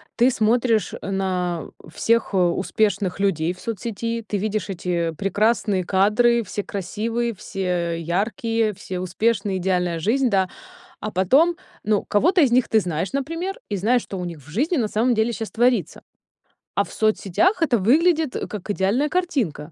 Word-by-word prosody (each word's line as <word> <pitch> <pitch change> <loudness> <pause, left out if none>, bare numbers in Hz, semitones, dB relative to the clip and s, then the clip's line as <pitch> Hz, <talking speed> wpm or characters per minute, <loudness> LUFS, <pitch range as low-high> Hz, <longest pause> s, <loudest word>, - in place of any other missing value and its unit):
ты 245 +2 +4
смотришь 225 -1 +1
на 185 -3 -2 0.2
всех 230 +5 +1
успешных 190 +2 +1
людей 175 -5 +1
в 185 - -18
соцсети, 230 +1 -4
ты 205 - -2
видишь 210 -1 -2
эти 175 -3 -1
прекрасные 205 -1 +1
кадры, 215 +6 +3
все 205 0 -4
красивые, 225 +5 -2
все 175 -3 -2
яркие, 215 +6 0
все 185 -1 -6
успешные, 200 +1 0
идеальная 180 -2 0
жизнь, 250 +8 +2
да. 190 -3 +2 0.5
А 215 - -4
потом, 270 - +3 0.3
ну, 210 -1 +2
кого-то 345 - +3
из 270 -5 +4
них 250 0 +3
ты 220 -1 +3
знаешь, 175 - -3
например, 330 +8 -3
и 205 - -1
знаешь, 235 +6 +2
что 195 - -7
у 180 - -3
них 170 -3 -7
в 145 - -15
жизни 285 - 0
на 225 -5 0
самом 235 +4 +2
деле 220 +2 +1
щас 225 -1 -5
творится. 235 - +1 0.7
А - - +3
в - - -12
соцсетях 220 - +1
это 245 -8 +2
выглядит, 310 - +3
как 210 -1 -7
идеальная 205 +9 +1
картинка. 255 - -1
210 Hz, 155 wpm, -22 LUFS, 185-235 Hz, 0.7 s, ты